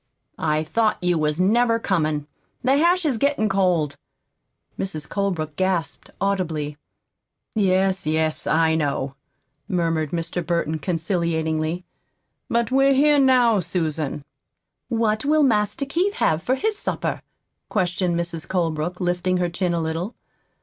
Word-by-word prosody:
"I 155 -1 +1
thought 215 +7 +1
you 175 -2 +2
wasn't 155 +6 +2
never 235 0 +3
comin'. 155 -9 0 0.4
The 260 +2 +4
hash 345 +3 +3
is 260 -7 +1
gettin' 280 -5 +2
cold." 180 -7 +1 0.8
Mrs. 155 -6 -3
Colebrook 175 -7 -2
gasped 185 -6 -1
audibly. 165 -7 -1 0.8
"Yes, 190 -4 +1
yes, 155 0 0
I 160 0 +3
know," 140 -3 -1 0.5
murmured 165 -4 0
Mr. 170 +2 -2
Burton 165 -2 -1
conciliatingly. 165 0 -1 0.6
"But 235 0 +1
we're 270 +1 +4
here 295 +1 +5
now, 250 -5 +4
Susan." 155 -5 -2 0.6
"What 220 -2 +1
will 305 +1 +3
Master 220 +1 +1
Keith 355 +8 0
have 160 +1 +1
for 255 - +1
his 430 +8 0
supper?" - - -2 0.5
questioned 180 -3 0
Mrs. 170 -1 -4
Colebrook, 170 -1 -1
lifting 180 0 0
her 175 -1 0
chin 175 0 -1
a - - 0
little. 165 +7 -3
180 Hz, 130 wpm, -23 LUFS, 160-220 Hz, 0.8 s, here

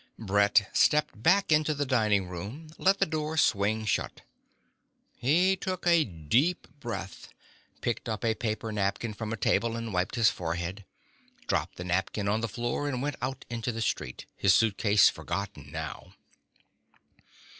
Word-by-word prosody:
Brett 105 -1 +3
stepped 150 -7 +2
back 190 - +3
into 155 0 +3
the 145 0 -1
dining 105 -7 +2
room, 100 - -7
let 195 +1 +4
the 195 - +3
door 155 -1 -3
swing 110 -4 +2
shut. 105 - -1 1.0
He 175 +10 +3
took 185 -1 -4
a 170 -2 +5
deep 110 - 0
breath, 115 -8 -6 0.5
picked 120 0 -2
up 110 +1 -3
a 115 - +3
paper 110 -1 -3
napkin 105 +2 -1
from 110 0 -5
a 115 - -2
table 115 +3 +1
and 115 -2 -5
wiped 90 +4 0
his 115 -2 +4
forehead, 85 +3 -4 0.6
dropped - - -1
the 90 - -6
napkin 95 +3 -1
on 105 +2 +1
the 115 - -1
floor 120 +7 -2
and 130 -2 -2
went 145 0 -2
out 135 +1 -4
into 120 0 -3
the 115 - -5
street, - - -3
his 95 -1 +4
suitcase 105 -2 +4
forgotten 100 +3 -4
now. - - -6
115 Hz, 155 wpm, -28 LUFS, 100-145 Hz, 1.0 s, a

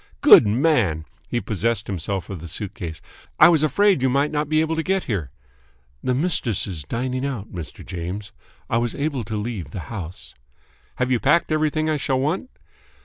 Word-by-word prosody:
"Good - - +9
man!" 110 - +2 0.2
He 120 - 0
possessed 110 0 -1
himself 95 +1 -3
of 95 - -5
the 85 - -7
suitcase. 90 -2 -5 0.4
"I 155 - +9
was 165 -4 +4
afraid 195 +2 +3
you 130 - +3
might 140 +3 +1
not 150 -1 -1
be 155 0 +3
able 160 +1 +1
to 160 - 0
get 190 +2 0
here." 95 - -3 0.7
"The 125 - +1
mistress 135 - 0
is 90 -6 -5
dining 125 - -2
out, 125 -8 -4
Mr. 85 -4 -8
James. 95 +3 -5 0.4
I 115 - +1
was 120 -1 -2
able 140 -4 -2
to 110 +2 -5
leave 105 - -4
the 95 - -6
house." 90 -4 -7 0.6
"Have 125 0 -1
you 125 - +3
packed 155 +6 +3
everything 155 0 +1
I 155 -1 +1
shall 135 -2 0
want?" 165 - -1
120 Hz, 185 wpm, -23 LUFS, 100-150 Hz, 0.7 s, Good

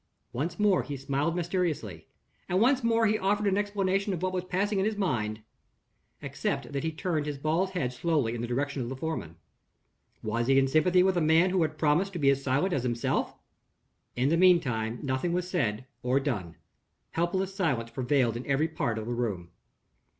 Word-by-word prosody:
Once 160 +8 -3
more 205 -3 +4
he 145 -1 -6
smiled 140 +5 -1
mysteriously; 165 - -2 0.4
and 180 +1 +2
once 255 +3 +3
more 230 0 +3
he 215 0 +2
offered 200 +1 +1
no 200 - +2
explanation 200 -1 0
of 180 0 -4
what 185 0 0
was 180 -1 -1
passing 195 +3 0
in 190 - +1
his 215 -1 -1
mind 110 - -1 0.8
except - - -3
that 140 +1 -3
he 160 - -1
turned 155 -2 -2
his 145 -1 -3
bald 160 +6 0
head 125 -6 -1
slowly 140 -4 0
in 120 - -4
the 120 - -3
direction 140 +3 -2
of 120 - -3
the 135 - -4
foreman. 130 - -4 0.9
Was 115 +2 -1
he 135 0 +4
in 135 0 +4
sympathy 175 +6 +4
with 190 -1 +2
a - - +2
man 160 +4 +4
who 185 -1 +2
had 155 -1 -1
promised 170 +6 +2
to 175 - -4
be 140 -2 +5
as 135 0 0
silent 140 +8 +1
as 135 - +1
himself? 120 -1 -1 0.8
In 130 +3 +1
the 165 - +3
meantime, 125 -11 +3
nothing 135 +5 -1
was 180 0 -1
said 130 - -1 0.2
or 125 +2 +2
done. 105 - -3 0.6
Helpless 185 +3 -1
silence 135 - -1
prevailed 125 -3 +1
in 120 - -4
every 140 +3 +2
part 115 -7 -2
of 110 - -4
the 120 - -3
room. 100 -8 -3
155 Hz, 195 wpm, -28 LUFS, 125-185 Hz, 0.9 s, be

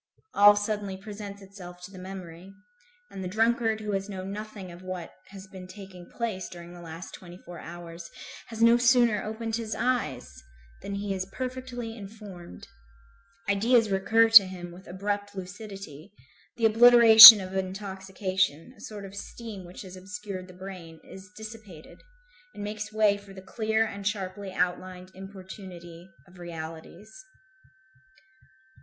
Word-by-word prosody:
All 205 0 +7
suddenly 205 -2 -3
presents 200 0 -9
itself 180 -2 -12
to 185 - -10
the 190 - -11
memory; 185 -1 -10 0.6
and 190 - -7
the - - -4
drunkard 225 +2 0
who 210 -1 -4
has 195 0 -3
known 190 -1 -6
nothing 205 -3 -8
of 175 +1 -12
what 185 -2 -7 0.2
has 195 -1 -12
been 190 -2 -11
taking 185 -2 -12
place 220 -6 -4
during 175 0 -11
the 175 - -12
last 165 +1 -10
twenty 175 -1 -12
four 175 -1 -12
hours, 170 0 -10 0.4
has 230 0 -3
no 230 +1 +6
sooner 240 -3 +3
opened 225 +1 -4
his 225 -2 -5
eyes 135 - -2 0.4
than 200 - -6
he 200 0 -3
is 185 -1 -4
perfectly 250 0 -6
informed. 195 - -11 0.8
Ideas 220 +2 +2
recur 220 +4 +3
to 220 -3 +10
him 175 -2 -9
with 180 +2 -14
abrupt 205 +2 -4
lucidity; 190 -3 -9 0.5
the 230 - +1
obliteration 225 -1 +11
of 190 0 -7
intoxication, 190 - -3
a - - -19
sort 205 -2 -8
of 195 - -11
steam 205 -2 -9
which 175 +3 -11
has 185 -1 -11
obscured 195 0 -8
the 185 - -14
brain, 180 -4 -10
is 190 0 -13
dissipated, 215 -7 -12 0.5
and 205 - -7
makes 210 +1 -5
way 215 -2 +2
for 200 -1 -14
the 190 -1 -12
clear 220 +3 0
and 200 -2 -6
sharply 195 -1 -4
outlined 180 +1 -3
importunity 185 -2 -11 0.2
of 180 0 -18
realities. 170 +4 -9
195 Hz, 150 wpm, -27 LUFS, 185-215 Hz, 0.8 s, obliteration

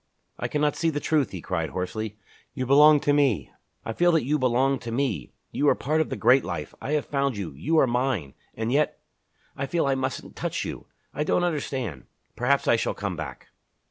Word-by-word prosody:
"I - - -1
cannot 150 0 0
see 165 - +1
the 145 -2 -2
truth!" 150 -2 +1
he 95 - -7
cried 85 -3 -2
hoarsely. 105 +3 -4 0.4
"You 130 - -2
belong 150 +3 +7
to 145 - +2
me 130 - +2 0.3
I 115 - -3
feel 175 +7 +3
that 160 -6 +2
you 150 +3 +1
belong 130 +2 +2
to 115 - -6
me! 125 - -1 0.2
You 145 - +2
are - - +4
part 155 +4 0
of 160 - -1
the - - -2
great 130 +1 +4
life. 75 -4 -5
I 145 - -2
have 150 - +1
found 140 -4 -1
you 95 -6 -4
you 140 - -1
are 155 - +6
mine! 120 - -1 0.2
And 110 +1 -2
yet... 150 +3 +1 0.6
I 140 - -3
feel 170 +2 0
I 135 - +2
mustn't 130 0 -3
touch - - -3
you. - - -7 0.3
I 150 - -1
don't 175 - +1
understand. 130 - -2 0.3
Perhaps 135 +3 +1
I 120 - +5
shall - - -1
come 100 -3 -3
back." 80 -1 -7
135 Hz, 210 wpm, -26 LUFS, 110-145 Hz, 0.6 s, belong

